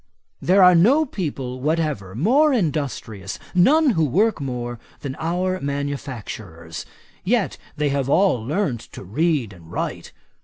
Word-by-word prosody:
There 190 +2 +5
are 180 0 +8
no 245 - +5
people 135 - -4
whatever 150 - -1
more 265 - +4
industrious, 140 - -2 0.2
none 280 - +5
who 165 -7 +1
work 190 - +2
more, 120 -3 -4 0.2
than 135 -2 -4
our 180 +3 -1
manufacturers; 120 - -5 0.4
yet - - 0 0.2
they 150 -1 +1
have 140 -1 -1
all 180 - +3
learnt 145 - -1
to - - -8
read 130 - 0
and 85 -2 -15
write. - - -4
145 Hz, 130 wpm, -22 LUFS, 120-185 Hz, 0.4 s, are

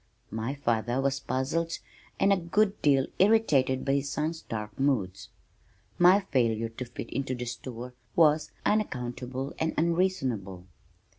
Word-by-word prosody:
My 115 +5 -3
father 120 -2 0
was 140 0 0
puzzled 140 +6 -1 0.4
and 200 - +5
a - - +2
good 195 +4 +1
deal 135 -3 +4
irritated 155 -12 +3
by 135 - +2
his 140 0 0
son's 160 +2 -2
dark 105 -1 -6
moods. 105 -9 0 0.7
My 180 +3 +7
failure 115 - 0
to 115 +3 -6
fit 120 - -8
into 130 -2 -2
the 125 0 -5
store 120 +1 -7 0.2
was 155 -2 +4
unaccountable 130 - -2
and 160 0 0
unreasonable. 135 - 0
135 Hz, 135 wpm, -28 LUFS, 120-165 Hz, 0.7 s, My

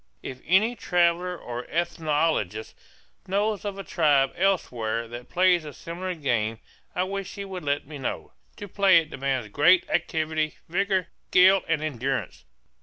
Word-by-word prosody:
If 130 0 -7
any 210 +8 +3
traveller 180 -2 +1
or 120 -3 -7
ethnologist 155 - -1 0.5
knows 205 +2 0
of 200 -1 -4
a 195 - -5
tribe 145 -7 +2
elsewhere 115 - 0
that 120 +2 -9
plays 180 -2 +3
a 150 -2 -8
similar 180 +2 -5
game, 115 -7 -1 0.4
I 180 - +1
wish 195 0 -5
he 200 - -5
would 190 -2 -7
let 145 0 -1
me 145 0 -9
know. 130 - -4 0.2
To 205 - -8
play 195 -2 +5
it 160 -2 +1
demands 135 -4 -2
great 165 - +4
activity, 155 -1 -1
vigor, 190 0 0 0.2
skill, 190 +1 +6
and 160 -2 0
endurance. 135 -2 -3
165 Hz, 150 wpm, -26 LUFS, 135-185 Hz, 0.5 s, skill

